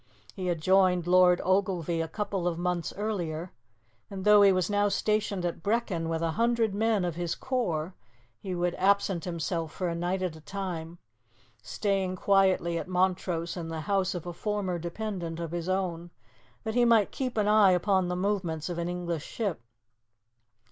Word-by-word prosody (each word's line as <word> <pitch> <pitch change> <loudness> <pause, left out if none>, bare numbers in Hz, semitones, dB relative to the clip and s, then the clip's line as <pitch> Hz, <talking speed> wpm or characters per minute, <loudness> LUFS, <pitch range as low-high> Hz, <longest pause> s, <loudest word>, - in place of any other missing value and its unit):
He 185 -1 -4
had 170 -3 -1
joined 185 -1 +3
Lord 180 0 +5
Ogilvie 180 -3 +1
a 165 - -2
couple 195 0 -2
of 170 -2 -1
months 175 -1 -1
earlier, 180 -5 -3 0.6
and, 195 -1 -6
though 210 0 +7
he 200 -1 +7
was 185 -2 +1
now 205 0 +2
stationed 205 -2 0
at 170 -1 -3
Brechin 200 -5 -1
with 165 0 -1
a 165 - +1
hundred 230 +1 +1
men 215 -2 +1
of 175 - -2
his 170 0 -3
corps, 185 -11 -2 0.5
he 185 +5 -4
would 175 0 0
absent 195 -3 +2
himself 165 -2 -3
for 180 +1 -2
a - - -2
night 175 +3 -1
at 175 -3 -2
a 160 - -12
time, 175 -1 -5 0.6
staying 195 -3 -1
quietly 185 -3 +2
at - - -6
Montrose 180 -2 0
in 170 -3 -5
the 165 -1 -4
house 190 +2 0
of 175 - -5
a 175 - -5
former 190 -1 -2
dependent 170 -1 -4
of 165 -2 -4
his 175 +1 -3
own, 175 -3 -2 0.5
that 220 - -3
he 245 +1 +3
might 230 -4 +4
keep 255 -3 -3
an 210 -1 +2
eye 210 -2 +6
upon 185 0 +2
the 180 - -2
movements 180 -5 -1
of 175 -1 -3
an 170 +1 -2
English 175 -3 -3
ship. 200 - -3
180 Hz, 180 wpm, -28 LUFS, 170-200 Hz, 0.6 s, though